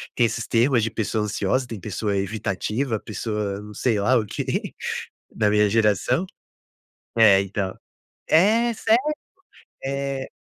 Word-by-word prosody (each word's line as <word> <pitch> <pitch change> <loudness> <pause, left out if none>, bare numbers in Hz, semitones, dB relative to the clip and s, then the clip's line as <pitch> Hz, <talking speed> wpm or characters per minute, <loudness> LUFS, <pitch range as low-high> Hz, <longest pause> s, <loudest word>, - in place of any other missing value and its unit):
tem 120 - +3
esses 115 0 -2
termos 120 0 +3
de 115 - -1
pessoa 110 -1 -1
ansiosa, 105 +5 0
tem 115 -3 -6
pessoa 105 +1 -2
evitativa, 110 +4 -2
pessoa 105 -2 -3
não 105 0 -10
sei 110 -2 +1
lá, 125 +6 +3
o 110 - -2
que - - -3 0.6
da 105 -2 +2
minha 105 0 +4
geração, 110 - +2 0.9
é 105 -4 +7
então 100 -1 -3 0.5
é 225 +8 +4
sério, 225 +2 +3 0.9
eh. 140 -1 -3
110 Hz, 130 wpm, -23 LUFS, 105-130 Hz, 0.9 s, é